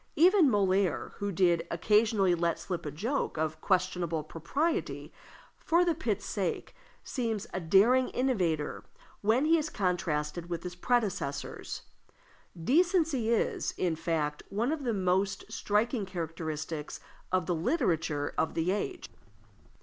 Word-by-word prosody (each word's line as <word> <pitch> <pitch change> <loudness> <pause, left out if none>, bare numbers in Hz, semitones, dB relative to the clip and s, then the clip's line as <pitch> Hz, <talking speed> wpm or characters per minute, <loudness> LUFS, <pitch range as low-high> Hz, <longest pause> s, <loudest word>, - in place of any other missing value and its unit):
Even 355 -2 +6
Molière, 195 -5 +1
who 205 0 -2
did 170 -2 +2
occasionally 210 +1 +3
let 170 -1 0
slip 180 -5 -4
a - - -3
joke 225 - -2
of 155 0 -2
questionable 180 -4 0
propriety, 275 - -2 0.5
for 345 +2 +3
the 340 - +3
pit's 215 -10 -2
sake, 190 -5 -3 0.3
seems 225 -6 -2
a - - -1
daring 210 +10 +4
innovator 180 - 0 0.4
when 225 +7 +3
he 325 +1 +4
is 310 0 -3
contrasted 175 - -1
with 170 -1 -3
his 180 -1 -5
predecessors. 195 - -2 0.8
Decency 310 - +2
is, 230 - 0
in 175 -3 0
fact, 155 -2 -1
one 225 +7 0
of 305 -4 -3
the 235 - +1
most 190 +1 0
striking 215 0 0
characteristics 160 -3 -4 0.3
of 185 -2 +1
the 175 - 0
literature 165 - 0
of 160 - 0
the 165 +2 +1
age. 200 -7 -3
190 Hz, 130 wpm, -30 LUFS, 165-235 Hz, 0.8 s, Even